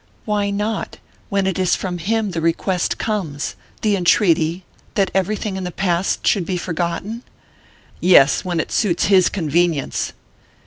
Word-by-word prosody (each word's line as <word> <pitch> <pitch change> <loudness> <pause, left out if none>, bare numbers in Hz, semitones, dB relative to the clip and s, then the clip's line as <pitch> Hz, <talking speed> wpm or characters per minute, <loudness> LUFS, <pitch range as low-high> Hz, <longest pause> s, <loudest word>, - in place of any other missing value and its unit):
"Why 205 -1 0
not? 210 +2 -3 0.3
When 200 -1 +1
it 190 -1 -1
is 185 -1 +3
from 180 -2 -4
him 215 +3 0
the 165 -2 -3
request 170 +2 0
comes 170 -10 -3 0.3
the 210 -2 +3
entreaty 175 -2 +2 0.3
that 195 -2 +1
everything 195 +1 -1
in 190 - -4
the 180 - -3
past 180 0 -1
should 195 - +3
be 180 +1 -2
forgotten?" 175 +6 -3 0.8
"Yes 160 -6 +5
when 175 -2 -2
it - - -3
suits 185 -6 +1
his 185 -2 +6
convenience!" 165 -4 0
185 Hz, 145 wpm, -20 LUFS, 170-200 Hz, 0.8 s, his